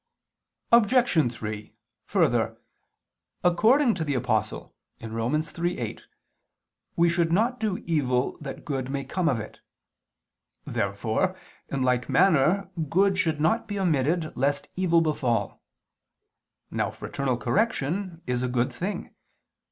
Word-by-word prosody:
Obj. 235 - +4
3: 105 -2 -7 0.3
Further, - - +1 0.9
according 225 +9 +4
to 165 - -2
the 145 -3 -1
Apostle 110 -4 -1 0.3
(Rom. 115 +3 -3
3:8) 160 -5 -2 0.9
we 170 0 +4
should 170 -1 +1
not 235 +8 +2
do 210 -4 -1
evil 130 -6 +1
that 135 -2 -7
good 135 -5 -3
may 140 0 -2
come 180 +1 0
of 125 - 0
it. 105 - -9 1.1
Therefore, - - -1 0.3
in 135 -2 -1
like 125 -1 +1
manner, 185 +2 +3 0.2
good 195 +3 +3
should 160 -4 +1
not 170 +10 +1
be 205 - -4
omitted 160 -2 0
lest 140 +2 0
evil 170 -2 +3
befall. 125 -9 -1 1.1
Now - - 0
fraternal 135 -3 -3
correction 185 - -1
is 125 -1 -1
a 125 - 0
good 125 0 0
thing. 195 +4 -4
155 Hz, 120 wpm, -26 LUFS, 125-185 Hz, 1.1 s, Obj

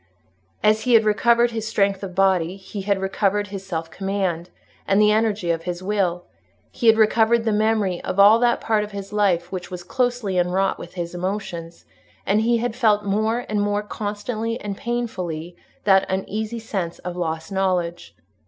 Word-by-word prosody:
As 215 +1 +4
he 245 0 +3
had 220 -1 +5
recovered 235 +3 +3
his 225 -1 -4
strength 200 -3 +1
of 190 -3 -7
body, 190 -2 +2
he 195 +1 -7
had 200 0 0
recovered 200 +1 0
his 195 -1 -6
self 165 -3 -5
command 190 -2 -2 0.4
and 195 +1 +3
the 210 0 +5
energy 210 -5 +1
of 165 -1 -1
his 180 0 -4
will; 185 -3 0 0.5
he 235 - -2
had 225 0 +7
recovered 225 +1 +3
the 225 - +1
memory 210 -3 +1
of 190 - -3
all 210 +3 +8
that 240 0 +2
part 215 -2 +1
of 210 0 -8
his 200 0 -7
life 180 -4 +1
which 185 -2 -5
was 180 -1 -7
closely 245 -3 0
enwrought 185 +2 +1
with - - -10
his 170 -1 -4
emotions; 175 -2 -5 0.4
and 210 +3 +2
he 235 +1 +2
had 230 0 -2
felt 215 -4 +2
more 220 +4 0
and 210 -1 0
more 205 0 0
constantly 215 +3 -4
and 205 -1 -5
painfully 185 -9 -4 0.3
the 195 -2 +3
uneasy 215 +4 -3
sense 190 -7 -4
of 180 0 -6
lost 165 +1 -3
knowledge. 180 -3 -1
200 Hz, 180 wpm, -22 LUFS, 180-220 Hz, 0.5 s, all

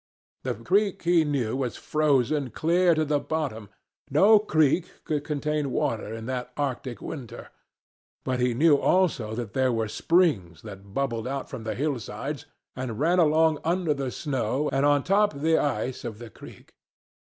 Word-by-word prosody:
The - - -2
creek 195 - 0
he 170 -1 +4
knew 135 -6 -1
was 130 -3 -3
frozen 145 -2 +1
clear 170 +5 +2
to 155 0 +1
the 145 0 +1
bottom—no 145 - +1
creek 160 -3 +2
could 150 -2 -2
contain 150 -1 -2
water 110 -4 -1
in 110 0 -6
that 125 0 -4
arctic 130 -3 -3
winter—but 130 -1 -8
he 125 -1 +1
knew 150 +2 +5
also 140 -13 +1
that 115 -3 -5
there 130 -1 +2
were 115 -2 -1
springs 105 - +1
that 100 -2 -11
bubbled 125 -4 -1
out 135 +1 -4
from 110 - -7
the 110 -1 -3
hillsides 140 0 -4 0.3
and 130 -3 -5
ran 170 +5 +3
along 160 -1 +3
under 170 -1 +1
the 135 -2 -3
snow 135 +1 -2
and 135 +1 +3
on 145 -2 +3
top 205 -2 +2
the 160 +3 +2
ice 130 -2 -2
of 115 -3 -6
the 115 -1 -10
creek. - - -14
140 Hz, 155 wpm, -26 LUFS, 120-155 Hz, 0.3 s, knew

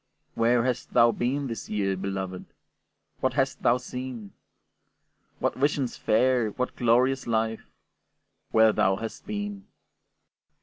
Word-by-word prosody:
Where 115 +1 +3
hast 125 -1 -3
thou 115 0 +6
been 135 +5 -1
this 115 -4 -6
year, 100 -2 0
beloved? 95 -1 -4 0.7
What - - 0
hast - - 0
thou 120 - +4
seen? 125 -4 -7 1.1
What - - 0
visions 140 -2 0
fair, 120 0 +2
what 125 +5 -3
glorious 125 +3 +2
life, 110 -1 -1 0.8
Where 110 -1 +5
thou 95 +1 +2
hast 110 +3 -7
been? 205 -1 -5
120 Hz, 120 wpm, -27 LUFS, 110-130 Hz, 1.1 s, thou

